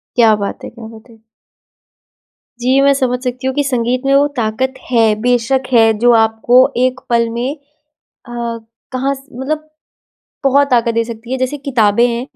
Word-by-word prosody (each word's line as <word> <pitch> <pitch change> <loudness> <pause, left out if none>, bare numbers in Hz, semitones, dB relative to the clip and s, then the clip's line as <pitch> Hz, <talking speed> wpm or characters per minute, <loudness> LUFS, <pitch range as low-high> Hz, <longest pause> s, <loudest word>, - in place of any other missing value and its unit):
क्या 225 -3 +5
बात 200 - -5
है - - -6
क्या 230 -2 -11
बात 225 +2 -14
है! 230 - -17 1.4
जी, 255 +3 +2
मैं 280 0 +4
समझ 255 -2 -1
सकती 255 +1 -3
हूँ 265 - -1
कि 290 - +1
संगीत 250 -2 -1
में 275 - +2
वो 285 +1 +4
ताकत 235 +4 -1 0.2
है, 225 -3 +4
बेशक 245 +2 +1
है 225 -2 +5
जो 240 +1 +4
आपको 225 +2 +2 0.2
एक 255 +1 +1
पल 235 -1 +2
में 240 +3 -3
अ, - - -26 1.4
कहाँ 265 +2 -1
से 275 -2 -14
मतलब 310 +4 -4 0.8
बहुत 280 +1 +3
ताकत 235 -2 +2
दे 230 0 +1
सकती 230 +1 -8
है। 260 - -1
जैसे 255 +3 -2
किताबें 240 -5 +2
हैं, 235 0 -2
245 Hz, 175 wpm, -15 LUFS, 230-265 Hz, 1.4 s, क्या